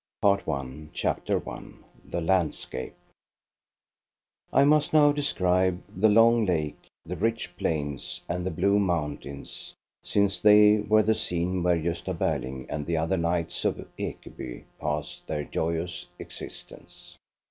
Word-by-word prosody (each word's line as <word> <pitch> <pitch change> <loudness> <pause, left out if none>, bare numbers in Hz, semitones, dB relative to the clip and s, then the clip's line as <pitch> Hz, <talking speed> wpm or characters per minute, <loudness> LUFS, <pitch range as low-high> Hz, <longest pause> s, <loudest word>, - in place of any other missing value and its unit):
• - - -65
PART 100 -1 +3
I 70 +1 -4
CHAPTER - - -1
I - - -6 0.4
THE 85 - -4
LANDSCAPE 85 -7 -1 1.6
I 135 - +5
MUST 150 +1 +3
now 150 -1 +7
describe 95 -10 +1
the 105 +4 +4
long 115 +2 +6
lake, 80 -6 -2 0.2
the - - -4
rich 115 -5 -1
plains 75 -7 -3
and 90 +1 -2
the 95 - -1
blue 100 +4 +2
mountains, 75 -6 -3 0.3
sipce 100 -1 +1
they 105 0 +7
were 110 +1 +3
the 110 +1 +3
scene 90 -2 -1
where 90 0 +3
Gosta 85 +3 -2
Berling 65 -3 -2
and 75 -2 -4
the 85 -1 0
other 80 +4 +1
knights 85 0 -1
of - - -1
Ekeby - - -6 0.2
passed 75 0 -4
their 75 -2 -2
joyous 85 +3 -3
existence. - - -11
90 Hz, 135 wpm, -27 LUFS, 80-105 Hz, 1.6 s, now